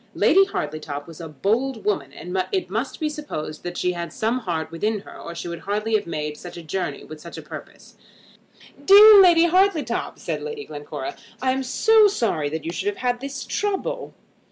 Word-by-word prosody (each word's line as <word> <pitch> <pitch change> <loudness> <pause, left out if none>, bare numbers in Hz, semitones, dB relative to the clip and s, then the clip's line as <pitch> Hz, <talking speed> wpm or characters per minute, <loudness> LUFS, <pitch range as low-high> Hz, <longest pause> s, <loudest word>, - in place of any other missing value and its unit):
Lady 390 - +5
Hartletop 150 - -4
was 165 -1 -11
a 165 - -6
bold 220 - -1
woman; 150 -10 -1
and 180 +5 -8 0.2
it 185 -1 -1
must 225 +6 -3
be 310 - 0
supposed 290 - -5
that 175 0 -6
she 180 - +1
had 170 -2 -5
some 225 +8 -1
heart 170 -8 -3
within 210 +5 -1
her - - -13
or 170 - -8
she 170 - -5
would 170 -1 -5
hardly 210 +4 -2
have 210 -3 +1
made 150 -2 -3
such 175 -1 -9
a 170 - -8
journey 165 -2 -3
with 155 -1 -11
such 170 - -10
a - - -6
purpose. - - -11 0.9
"Dear 410 +1 +10
Lady 345 -3 +6
Hartletop," 365 -2 +1
said - - -4
Lady 450 -2 -6
Glencora, 145 -2 -6 0.2
"I 260 0 +1
am 265 +1 -1
so 425 +12 +5
sorry 210 - 0
that 160 +1 -5
you 165 - -2
should 390 - -4
have 410 -1 -1
had 245 -6 -1
this 275 +1 -5
trouble." 405 -2 -3
210 Hz, 200 wpm, -23 LUFS, -, 0.9 s, Dear